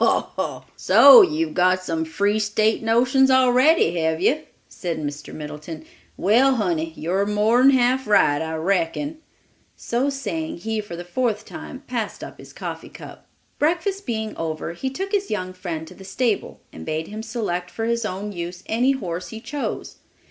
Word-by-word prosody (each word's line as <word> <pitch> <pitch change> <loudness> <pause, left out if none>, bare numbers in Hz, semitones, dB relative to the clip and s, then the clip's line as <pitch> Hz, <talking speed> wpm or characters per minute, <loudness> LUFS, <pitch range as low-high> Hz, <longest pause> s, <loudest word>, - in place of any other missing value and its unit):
"Ho, - - +2
ho! - - -3
So 275 -3 +8
you've 155 0 +1
got 185 +1 +2
some 165 -2 -2
free 200 +6 0
State 215 +1 +1
notions 245 +4 +3
already, 260 - +4
have 160 0 0
you?" 265 - +2 0.3
said 170 -3 -4
Mr. 145 -1 -6
Middleton. 150 - -8 0.3
"Well, 255 +7 +4
honey, 170 -7 -1
you're 190 +5 -1
more'n 220 +5 +4
half 260 -1 +2
right, 145 -8 +4
I 160 0 -3
reckon." 195 - -1 0.6
So 250 +4 -1
saying, 200 - -4
he 220 +4 -3
for 205 -5 -8
the 175 +1 -7
fourth 220 +2 -1
time 270 +1 -9
passed 235 -3 -4
up - - -10
his - - -12
coffee - - -7
cup. - - -12 0.3
Breakfast 355 +5 0
being 220 -2 -3
over, 160 0 -4
he 265 +10 -3
took 385 +9 -5
his 400 -1 0
young 185 -3 -3
friend 170 -4 -5
to - - -12
the 195 - -13
stable 210 +3 -2
and 80 - -9
bade 155 - -3
him 215 +1 -6
select 210 -6 -3
for 225 - -4
his 235 0 0
own 205 0 -4
use 175 0 -6
any 250 +5 +2
horse 180 -8 -5
he 220 - -8
chose. 290 +5 -5
210 Hz, 170 wpm, -22 LUFS, 170-250 Hz, 0.6 s, So